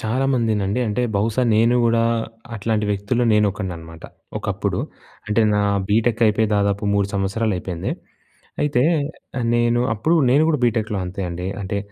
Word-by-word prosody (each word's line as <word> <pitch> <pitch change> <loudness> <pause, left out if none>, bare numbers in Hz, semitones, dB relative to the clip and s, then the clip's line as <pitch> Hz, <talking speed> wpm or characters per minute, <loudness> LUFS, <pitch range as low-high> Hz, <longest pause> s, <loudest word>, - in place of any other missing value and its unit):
చాలామందినండీ, 115 -3 0
అంటే, 105 +4 -1
బహుశా 110 +5 +1
నేను 115 +3 +4
గూడా 115 0 +3 0.5
అట్లాంటి 110 0 -1
వ్యక్తుల్లో 105 +5 0
నేనొకడిననమాట 90 -6 -2 0.3
ఒకప్పుడు. - - -2 0.5
అంటే, 105 +1 +1
నా 105 - +2 0.3
బీటెక్కయిపోయి 110 0 +2
దాదాపు 100 +1 0
3 100 -1 +1
సంవత్సరాలయిపోయింది. 95 -3 -2 0.7
అయితే, 140 -4 +2 0.6
ఆహ్, 120 - -1
నేను 120 0 +2
అప్పుడు 135 +10 0
గూడా 140 - +3
నేను 145 +4 +4
గూడా 150 -5 +1
బీటెక్‍లో 110 -3 0
అంతే 90 +2 -6
అండీ. 90 +1 -5 0.2
అంటే, 100 +1 -2
110 Hz, 130 wpm, -21 LUFS, 100-120 Hz, 0.7 s, నేను